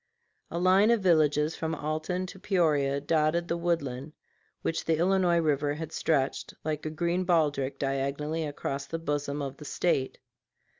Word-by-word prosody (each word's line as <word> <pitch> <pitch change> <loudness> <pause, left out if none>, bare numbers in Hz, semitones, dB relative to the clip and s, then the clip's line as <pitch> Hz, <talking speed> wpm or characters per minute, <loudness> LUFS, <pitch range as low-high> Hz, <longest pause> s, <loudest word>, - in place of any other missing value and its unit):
A - - -4
line 185 +4 +5
of 235 -2 +3
villages 155 -3 +3
from 160 0 -2
Alton 155 +5 -2
to 190 +1 -10
Peoria 155 -8 +2
dotted 155 +3 +1
the 170 - 0
woodland 155 -5 -2 0.5
which 165 - -1
the 165 -1 +1
Illinois 180 0 +3
River 145 -3 +1
had 160 0 -6
stretched, 140 -5 -1
like 155 0 -2
a - - -1
green 170 +3 0
baldric, 150 -6 +1
diagonally 140 +3 -1
across 140 -2 -4
the 165 - -3
bosom 145 -2 -2
of 135 0 -5
the 150 - -10
State. 140 -3 0
155 Hz, 155 wpm, -28 LUFS, 145-170 Hz, 0.5 s, line